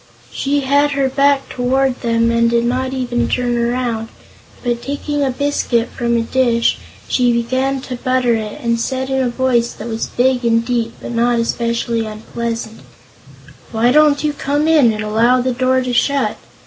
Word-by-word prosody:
She 285 +1 -1
had 285 +2 +2
her 275 -1 +1
back 275 +1 +2
toward 255 +1 0
them 230 -1 +1
and 235 0 +2
did 235 0 +1
not 255 +2 -1
even 245 -2 -1
turn 245 -1 0
around, 235 -1 -1 0.6
but 240 -1 -1
taking 285 +1 -2
a 270 - +1
biscuit 255 -3 0
from 235 0 -1
a - - +1
dish 235 -1 +1 0.3
she 245 -1 +2
began 260 +3 0
to 255 -1 -6
butter 255 -1 +1
it 215 -2 -4
and 235 0 +1
said 260 +2 -2
in 265 0 +1
a 250 - 0
voice 240 -1 0
that 215 - -8
was 225 -1 -3
big 250 0 +1
and 230 0 +2
deep 235 -2 -1
but - - -7
not 240 +1 +1
especially 230 0 -1
unpleasant: 225 +1 -5 0.9
"Why 230 +2 +2
don't 300 0 +4
you 300 -1 0
come 290 +2 -1
in 300 -8 +5
and 215 0 -4
allow 230 +4 +3
the 255 0 0
door 260 +1 +1
to 250 -1 -3
shut? 280 +3 +1
245 Hz, 175 wpm, -17 LUFS, 235-265 Hz, 0.9 s, in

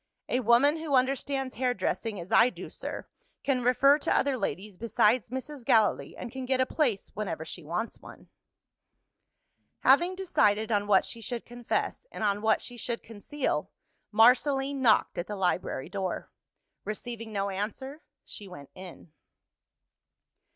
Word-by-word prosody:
"A 250 - +1
woman 255 +6 +4
who 315 -3 -1
understands 270 +1 0
hairdressing 225 -3 -1
as 170 +1 -9
I 245 - +6
do, - - -9
sir, - - -6 0.4
can 265 -3 +1
refer 275 +4 +5
to - - -1
other 275 -1 +2
ladies 205 -4 -4
besides 225 +2 +2
Mrs. 260 +2 -6
Gallilee, 220 -3 +2
and 240 - -7
can 260 0 -6
get 260 0 +1
a 260 - +4
place 255 -9 -1
whenever 195 -6 -4
she 175 - -7
wants 175 +9 -4
one." - - -14 1.5
Having 345 +8 +4
decided 220 - +1
on 205 -1 +1
what 195 -2 +4
she 230 - -8
should 235 +1 -5
confess, 240 - -3
and - - -5
on 205 -1 +1
what 220 0 +2
she 245 - -8
should 235 0 -4
conceal, 225 - -3 0.4
Marceline 270 +5 +4
knocked 225 -7 +3
at 175 - -3
the 210 - -4
library 180 -7 -1
door. 190 -2 -4 0.5
Receiving 225 +1 -6
no 200 -1 -1
answer, 265 +10 -5 0.2
she 205 - -7
went 145 -7 -11
in. 180 -3 -11
235 Hz, 150 wpm, -28 LUFS, 205-265 Hz, 1.5 s, I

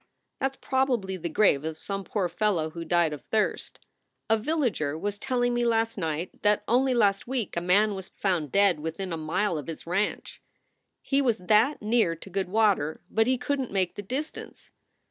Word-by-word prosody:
"That 270 0 0
s - - -22
probably 250 -8 0
the 170 -2 -4
grave 155 -5 +3
of 160 0 -4
some 195 +3 -4
poor 195 -4 -1
fellow 175 -3 0
who 170 +1 -6
died 170 -1 +2
of 145 - -7
thirst. 220 -1 -1 0.5
A - - +7
villager 220 - -1
was 205 +4 -3
telling 245 0 0
me 240 0 +1
last 225 -1 +1
night 165 -2 -4
that 210 0 +2
only 255 +2 +3
last 200 -3 +2
week 250 -5 -2
a 170 - 0
man 200 +4 +3
was 190 -1 -7
found 175 -8 -1
dead 200 -5 +4
within 165 +4 -4
a - - 0
mile 160 +3 -1
of 145 - -9
his 165 -2 -7
ranch. 195 +5 -2 0.6
He 275 0 +2
was 240 -5 +2
that 215 +8 +2
near 215 -6 +2
to 185 +4 -12
good 190 0 -2
water, 195 -8 +2
but 225 +1 +2
he 260 0 +2
couldn 270 0 -1
t - - -13
make 190 -2 +1
the - - -6
distance. 270 +10 -6
200 Hz, 195 wpm, -27 LUFS, 170-235 Hz, 0.6 s, A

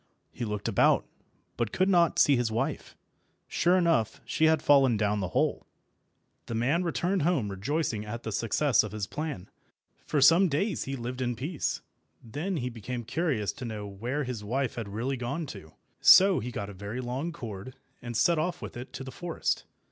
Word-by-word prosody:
He 120 - -4
looked 105 -1 -3
about, 115 - +3 0.5
but 115 -2 -1
could 185 - +2
not 175 -4 +3
see 145 - +5
his 120 -3 0
wife. 115 - -3 0.5
Sure 175 +2 +3
enough, 165 - +2
she 160 - +1
had 160 -1 +3
fallen 135 -5 +5
down 105 0 +1
the 95 - -1
hole. - - 0 0.8
The 115 - -3
man 135 +10 +1
returned 180 +2 0
home 145 - +1
rejoicing 110 +2 -2
at 115 +3 -6
the 110 - -4
success 115 +4 +2
of 105 -1 -6
his 105 -2 -2
plan. 150 - -5 0.6
For 150 - +1
some 165 +7 +6
days 170 +6 -1
he 135 - -3
lived 125 +1 -5
in 120 -1 -1
peace. 145 +6 -3 0.4
Then 160 - -3
he 125 -3 -2
became 120 +2 -5
curious 125 - -1
to 115 +6 -10
know 110 -3 -5
where 120 +9 -3
his 125 -5 -5
wife 130 +5 -1
had 115 -3 -5
really 120 +7 -2
gone 140 +7 -3
to. 85 -7 -12 0.3
So 195 0 +7
he 120 - -4
got 100 -4 -4
a - - -11
very 100 +5 -6
long 130 +7 -3
cord, 120 - -8 0.3
and 120 -1 -4
set 170 +2 +3
off 170 +2 -1
with - - -8
it 120 +2 -8
to 130 - -6
the 130 - -7
forest. 175 +2 -2
125 Hz, 190 wpm, -28 LUFS, 110-155 Hz, 0.8 s, So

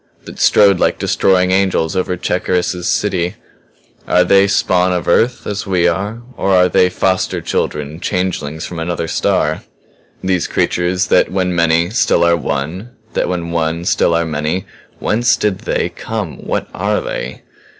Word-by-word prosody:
That - - -10
strode 100 -3 +5
like - - +1
destroying 95 -1 +2
angels 95 -3 +1
over 90 -1 -1
Cherkis's 90 0 -1
city? 90 -4 0 0.7
Are 90 - +4
they 100 +2 +4
spawn 90 -2 +2
of 90 -1 -2
Earth 120 +8 +2
as 105 0 -4
we 90 -2 +2
are? 105 +6 -2
Or 95 -1 +2
are 90 0 +5
they 90 0 +3
foster 95 +1 0
children 75 +1 -3
changelings 85 -5 -2
from 85 - -6
another 85 0 -3
star? - - 0 0.6
"These 95 -2 0
creatures 90 +3 0
that - - +3
when 90 -1 0
many 85 +1 +2
still 125 -5 +2
are 85 0 +4
one 85 - -3 0.2
that - - 0
when 85 -2 -3
one 85 0 -1
still 85 - +2
are 85 0 +1
many. 75 +3 -2 0.3
Whence 120 +3 +2
did 105 -4 -1
They - - -1
come? - - -5
What - - -2
are - - 0
They?" 65 +2 -5
90 Hz, 155 wpm, -16 LUFS, 85-95 Hz, 0.7 s, strode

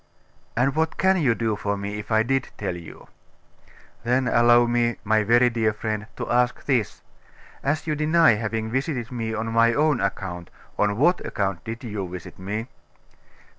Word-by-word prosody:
'And 135 +3 +2
what 160 0 0
can 190 0 +3
you 125 -6 +3
do 115 -2 -1
for 100 0 -2
me, 100 +1 -4
if 105 - -9
I 110 0 +4
did 135 +1 -1
tell 95 -3 -3
you?' 85 -2 -11 1.0
'Then 125 +2 +1
allow 120 0 +5
me, 120 -1 +1
my 110 0 +2
very 120 +3 +4
dear 110 -2 +1
friend, 110 0 -4
to - - -5
ask 125 0 +1
this. 125 -7 -1 0.6
As 150 +3 -1
you 155 - -1
deny 155 -1 +4
having 110 +1 -3
visited 130 -2 -2
me 115 -2 -3
on 110 +1 -3
my 115 +1 +4
own 150 -3 +2
account, 95 -3 -3 0.3
on 105 0 +2
what 175 +8 +3
account 95 -3 -2
did 115 +2 -6
you 105 -5 -4
visit 90 0 -9
me? 105 +5 -4
115 Hz, 170 wpm, -24 LUFS, 105-125 Hz, 1.0 s, allow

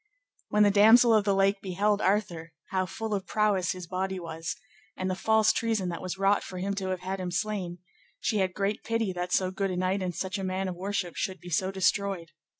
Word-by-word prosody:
When 210 0 +4
the 205 - +5
Damosel 225 +4 +7
of 215 -2 +4
the 200 -1 +2
Lake 195 +1 +2
beheld 205 +2 0
Arthur, 175 -5 0 0.2
how 185 -1 0
full 220 +4 -4
of 195 -2 -2
prowess 205 -4 +1
his 180 -1 -8
body 190 +2 -3
was, 165 -1 -5 0.4
and 185 0 -1
the - - -1
false 220 +2 +3
treason 220 -5 0
that 170 - -5
was 185 +1 -4
wrought 195 +1 +3
for 185 - -8
him 195 +2 -2
to 190 -1 -2
have 185 -1 -2
had 190 +1 -4
him 180 -1 -3
slain, 180 -2 -2 0.4
she 215 - 0
had 185 -2 0
great 200 +1 -1
pity 225 -4 -1
that 180 0 -4
so 185 0 +2
good 195 +1 -1
a 180 - -3
knight 185 +2 0
and 180 -2 -3
such 190 +1 -3
a - - -4
man 190 +1 -2
of 185 - -3
worship 190 -1 -3
should 190 -1 -2 0.2
so 185 +4 +2
be - - -6
destroyed. 190 -2 0
190 Hz, 230 wpm, -28 LUFS, 185-205 Hz, 0.4 s, Damosel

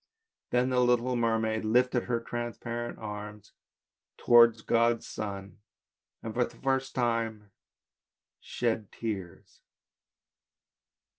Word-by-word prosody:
Then 125 +1 +1
the 125 - +2
little 125 0 +2
mermaid 115 -2 0
lifted 125 +2 +2
her 120 -1 0
transparent 120 0 -5
arms 105 -1 -8 0.7
towards 115 -2 +6
God's 115 0 +2
sun, 100 -3 -6 0.6
and 110 - -5
for 125 - +2
the - - -7
first 135 0 -1
time 115 -4 -1 0.9
shed 115 -4 -2
tears. 100 -6 -6
115 Hz, 95 wpm, -29 LUFS, 110-120 Hz, 0.9 s, towards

